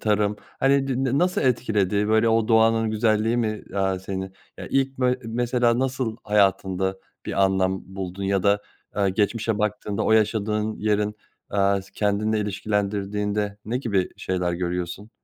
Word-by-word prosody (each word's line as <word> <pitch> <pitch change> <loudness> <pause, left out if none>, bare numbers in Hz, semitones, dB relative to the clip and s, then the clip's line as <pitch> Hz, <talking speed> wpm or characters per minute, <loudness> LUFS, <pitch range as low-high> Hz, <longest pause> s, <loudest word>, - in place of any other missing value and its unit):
tarım, 105 -1 +1 0.2
hani, 135 0 +3
d 135 0 0
na 135 +1 +1
nasıl 180 +1 +2
etkiledi? 105 -5 +1
Böyle, 110 +1 +4
o 115 0 +2
doğanın 115 0 +4
güzelliği 110 +1 +2
mi, 110 -3 -1
aaa, 95 -1 +1
seni, 95 0 -5 0.3
ya, - - -6
ilk 135 -1 0
bö 125 -1 +3
mesela, 120 +1 +1
nasıl 130 -4 -1
hayatında 95 -2 +1 0.3
bir 100 - +2
anlam 95 0 +1
buldun 95 0 -5
ya 95 -1 +1
da, 100 0 +3 0.3
aaa, 100 -1 +2
geçmişe 105 +2 0
baktığında 105 -1 -1
o 110 - +3
yaşadığın 110 0 +1
yerin, 105 0 0 0.4
eee, 100 -1 +2
s 100 - -18
kendinle 105 +1 +1
ilişkilendirdiğinde 105 0 -2
ne 120 +4 -1
gibi 100 -8 0
şeyler 90 -1 -1
görüyorsun? 90 +3 -3
105 Hz, 150 wpm, -24 LUFS, 100-115 Hz, 0.4 s, Böyle